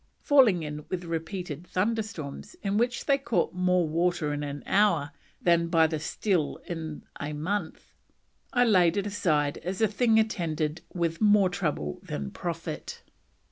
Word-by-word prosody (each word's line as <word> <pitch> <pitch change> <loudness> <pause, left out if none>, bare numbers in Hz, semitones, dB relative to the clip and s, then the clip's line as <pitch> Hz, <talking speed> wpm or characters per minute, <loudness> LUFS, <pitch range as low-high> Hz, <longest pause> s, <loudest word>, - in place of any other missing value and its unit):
Falling 245 - +5
in 150 0 -5
with 180 -1 -3
repeated 165 0 -5
thunderstorms 205 - -3
in 195 0 0
which 240 +2 0
they 275 -1 +3
caught 240 -4 0
more 180 -1 +2
water 165 -1 0
in 145 - -3
an 145 -1 -5
hour 180 -8 +2 0.3
"than 170 -1 +3
by 165 -1 +4
the 155 -1 -1
still 170 0 -1
in 160 -3 -5 0.2
a 145 +1 -4
month, 165 +3 -4 0.6
I 245 0 +4
laid 180 -5 +4
it 200 - 0
a 205 - -3
side 150 -7 +1
as 185 +2 -4
a 220 - +4
thing 220 +2 +2
attended 165 -8 0
with 170 0 -2
more 205 -3 +5
trouble 150 - -2
than 70 -1 -5
profit." - - -5
175 Hz, 155 wpm, -28 LUFS, 155-205 Hz, 0.6 s, Falling